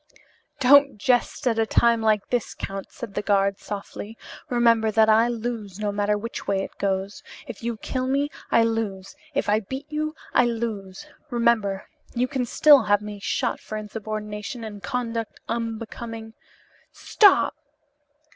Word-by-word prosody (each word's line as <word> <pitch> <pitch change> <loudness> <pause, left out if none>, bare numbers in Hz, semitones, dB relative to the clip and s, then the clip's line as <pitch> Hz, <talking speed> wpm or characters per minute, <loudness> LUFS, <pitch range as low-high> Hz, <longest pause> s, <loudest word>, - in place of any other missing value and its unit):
"Don't 280 0 +6
jest 245 +5 +1
at 225 -2 +2
a 225 - +2
time 235 0 +3
like 215 -2 +1
this, 245 -3 -1
count," 195 0 -6
said 235 -7 -8
the 205 - -1
guard, 200 -1 +1
softly. 205 +2 -7 0.3
"Remember 230 -2 +3
that 220 0 +4
I 225 +2 +5
lose, 230 -5 -4
no 210 -1 -1
matter 205 +1 +1
which 230 +3 -6
way 195 -1 +1
it - - -8
goes. 195 0 -2 0.2
If 245 -7 -9
you 235 -1 -3
kill 255 +4 -3
me 280 +2 0 0.2
I 230 - +5
lose, 225 -1 -2 0.2
if 280 - 0
I 210 +1 +3
beat 265 +7 -6
you 310 +1 -2 0.2
I 245 - +5
lose. 225 -2 -4 0.2
Remember, 230 -6 +1 0.3
you 245 +1 +1
can 250 -1 -2
still 290 +2 +7
have 205 0 +3
me 210 -1 -7
shot 195 - -1
for 215 - -6
insubordination 215 +2 -5
and 205 -2 -7
conduct 230 +2 -3
unbecoming 225 0 -5 0.4
" - - -32
"Stop!" 410 -3 +4
225 Hz, 155 wpm, -24 LUFS, 205-240 Hz, 0.4 s, still